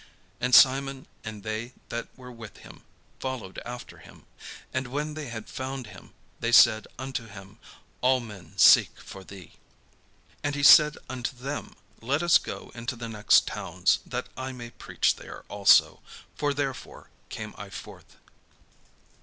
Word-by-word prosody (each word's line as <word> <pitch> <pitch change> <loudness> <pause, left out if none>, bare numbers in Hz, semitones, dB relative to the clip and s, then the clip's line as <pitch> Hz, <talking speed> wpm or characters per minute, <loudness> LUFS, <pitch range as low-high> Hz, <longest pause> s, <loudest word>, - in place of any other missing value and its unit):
And 125 +1 +3
Simon 135 0 +5 0.2
and 110 -2 -8
they 110 +3 -4 0.2
that 120 - -4
were 125 -1 -11
with 115 -3 -11
him - - -14 0.4
followed 130 -8 -5
after 120 0 -9
him. - - -17 0.5
And 130 0 -2
when 150 +4 -3
they 150 -2 -6
had 110 -2 -7
found 130 -1 -5
him, - - -14 0.2
they 115 - -1
said 115 -2 +6
unto 130 -3 -5
him, 95 -1 -13 0.4
"All 130 +1 +3
men 105 -8 -11
seek - - +6
for 95 - -11
thee." 95 -2 -12 0.9
And 145 0 -1
he 145 - -3
said 150 +2 +8
unto 130 +1 -4
them, 140 +4 -6 0.3
"Let 140 +8 0
us 175 0 +6
go - - -8
into 120 +1 -5
the 115 -1 -7
next 105 -2 +4
towns, - - 0
that - - -4
I 130 0 -5
may 120 -2 -9
preach - - -1
there - - -11
also; 100 -1 +4 0.4
for 145 -1 0
therefore 140 -2 -5 0.2
came - - -7
I - - -9
forth." - - -12
125 Hz, 155 wpm, -27 LUFS, 110-135 Hz, 0.9 s, said